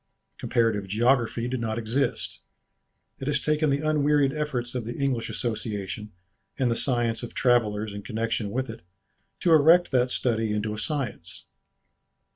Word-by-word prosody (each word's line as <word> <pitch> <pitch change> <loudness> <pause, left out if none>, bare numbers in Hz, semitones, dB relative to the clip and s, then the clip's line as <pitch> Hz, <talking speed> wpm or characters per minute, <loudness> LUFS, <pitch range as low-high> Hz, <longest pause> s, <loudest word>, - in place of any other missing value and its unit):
Comparative 110 -4 +1
geography 120 +2 +2
did 130 0 -2
not 110 -1 -2
exist. 115 +5 -1 0.8
It 135 - -5
has 145 -2 +1
taken 150 +1 +1
the 140 +2 0
unwearied 145 -2 +3
efforts 135 -6 -3
of 125 -2 -2
the 120 +2 -6
English 135 -5 -1
Association 105 -3 -4 0.5
and 125 -3 +1
the - - +1
science 120 -3 0
of 120 - -8
travellers 110 -4 +2
in 100 - -6
connexion 110 0 -2
with 130 +5 -2
it 115 - -8 0.6
to 170 - +4
erect 165 +3 +6
that 125 -1 +3
study 115 -4 0
into 105 0 -1
a - - -5
science. 105 - -4
120 Hz, 150 wpm, -26 LUFS, 110-140 Hz, 0.8 s, erect